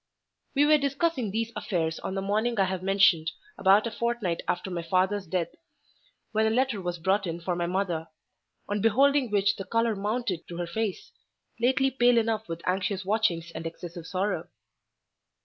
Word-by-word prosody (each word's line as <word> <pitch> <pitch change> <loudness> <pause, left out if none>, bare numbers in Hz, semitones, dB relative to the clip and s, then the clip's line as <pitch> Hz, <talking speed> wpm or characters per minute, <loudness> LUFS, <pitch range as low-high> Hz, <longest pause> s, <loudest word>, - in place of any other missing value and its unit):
We 285 +2 +5
were 305 0 +5
discussing 280 -3 0
these 225 +3 -2
affairs 160 -4 -1
on 190 - -4
the 195 - -2
morning 215 +3 0
I - - +6
have 185 -1 -3
mentioned, 185 -4 +3 0.2
about 195 +3 +4
a 230 - -2
fortnight 235 -8 -1
after 180 +2 -2
my 175 -1 -2
father's 185 +3 0
death, 170 0 -1 0.8
when 220 0 +2
a - - +3
letter 240 -2 +1
was 175 -1 -3
brought 190 +3 +1
in 165 0 -3
for 175 +1 -2
my 175 0 -1
mother, 175 -3 -1 0.6
on 205 0 -1
beholding 270 +4 +4
which 205 0 +2
the 195 - -4
colour 230 +1 +1
mounted 205 -3 -2
to 170 - -7
her 175 - -2
face—lately 230 +6 -2
pale 245 -2 +4
enough 220 -3 0
with 165 0 -5
anxious 185 +1 0
watchings 185 -5 0
and 165 - -4
excessive 170 0 -8
sorrow. 195 +2 -1
200 Hz, 170 wpm, -27 LUFS, 175-230 Hz, 0.8 s, I